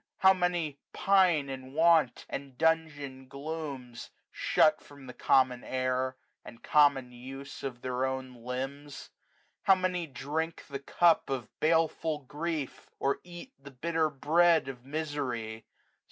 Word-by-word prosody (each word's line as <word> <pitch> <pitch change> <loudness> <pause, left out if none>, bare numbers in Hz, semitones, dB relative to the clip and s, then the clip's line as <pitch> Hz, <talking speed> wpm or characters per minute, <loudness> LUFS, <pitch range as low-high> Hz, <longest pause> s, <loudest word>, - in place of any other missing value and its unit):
How 190 0 +6
many 175 -6 -1
pine 185 -7 +3
in 130 -1 -7
want, 160 -4 +3
and 140 -2 -7
dungeon 150 -5 0
glooms; 140 -4 -6 0.2
Shut 155 -1 +3
from 140 -2 -14
the 125 - -9
common 125 -1 +3
air, 130 0 -1 0.3
and 115 - -13
common 140 -4 +4
use 135 +3 -9
Of 125 -3 -6
their 125 0 -1
own 130 -1 -4
limbs. 135 +4 -6 0.5
How 195 - +6
many 180 -2 -1
drink 155 +4 -4
the 140 -1 -5
cup 165 +4 +3
Of 130 -5 -3
baleful 160 -1 +2
grief, 150 0 -4
or 140 - 0
eat 175 +9 -11
the 140 - -10
bitter 160 +4 0
bread 160 +4 +4
335 135 -1 -6
Of 120 - -27
misery. 135 -7 -3
140 Hz, 135 wpm, -30 LUFS, 130-160 Hz, 0.5 s, How